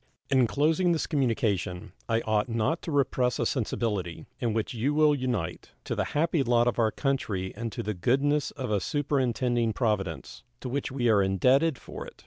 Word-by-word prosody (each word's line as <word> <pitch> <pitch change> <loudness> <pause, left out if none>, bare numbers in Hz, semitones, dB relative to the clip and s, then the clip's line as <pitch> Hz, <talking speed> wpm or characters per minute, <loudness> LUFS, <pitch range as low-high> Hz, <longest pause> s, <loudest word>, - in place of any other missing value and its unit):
In 130 -3 +4
closing 160 +7 +2
this 160 - -1
communication 110 - -1 0.2
I 115 0 +2
ought 110 +2 0
not 115 +9 0
to 165 - -5
repress 130 -3 +1
a - - 0
sensibility, 105 - -2
in 120 -4 0
which 110 +2 -2
you 130 +6 0
will 150 -1 +5
unite, 125 - -3
to - - -3
the - - -1
happy 165 0 +2
lot 120 -2 +3
of 120 - 0
our 110 -1 +4
country 105 -8 -2
and 115 -1 -4
to - - -5
the 105 - -2
goodness 140 +10 +1
of 130 -5 -5
a 105 - +2
superintending 125 -5 0
Providence, 105 -9 -2 0.2
to 130 - -5
which 135 +1 -2
we 130 -2 0
are 105 -3 +5
indebted 130 - +3
for - - -9
it. - - -14
120 Hz, 185 wpm, -27 LUFS, 110-140 Hz, 0.2 s, will